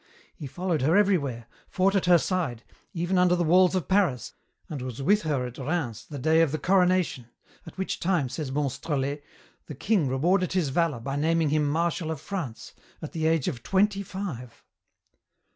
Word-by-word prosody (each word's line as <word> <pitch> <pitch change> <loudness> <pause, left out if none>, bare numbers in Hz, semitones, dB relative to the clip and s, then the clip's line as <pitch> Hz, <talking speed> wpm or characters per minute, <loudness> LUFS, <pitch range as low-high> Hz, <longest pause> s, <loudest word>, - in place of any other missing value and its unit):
He 145 - -7
followed 175 +1 -2
her 160 +8 +3
everywhere, 145 - +1 0.2
fought 190 +1 +1
at 195 -3 +1
her 175 -1 +7
side, 160 - -2 0.3
even 175 +2 0
under 180 0 +4
the 175 - 0
walls 180 +3 +4
of 180 -7 -1
Paris, 185 - +1 0.3
and 145 -4 -6
was 125 -1 -6
with 205 +10 +3
her 145 -5 -1
at 125 +2 -8
Rheims 130 -6 -3
the 145 - -7
day 160 +4 +3
of 165 -4 +2
the 155 - -1
coronation, 180 -6 +1 0.4
at 165 - -11
which 190 - -3
time, 175 -6 +1
says 140 +1 -5
Monstrelet, 140 0 -2 0.5
the 150 - -7
king 190 - +1
rewarded 175 +9 +1
his 180 -6 +1
valour 160 -2 0
by 135 +3 -3
naming 160 +1 +1
him 150 -1 +1
Marshal 165 +1 -1
of 160 -3 -3
France, 160 - -6 0.3
at 155 - -7
the 160 -1 -1
age 160 -4 +1
of 130 -10 -3
twenty 195 - +1
five." 175 - -7
160 Hz, 180 wpm, -26 LUFS, 135-185 Hz, 0.5 s, her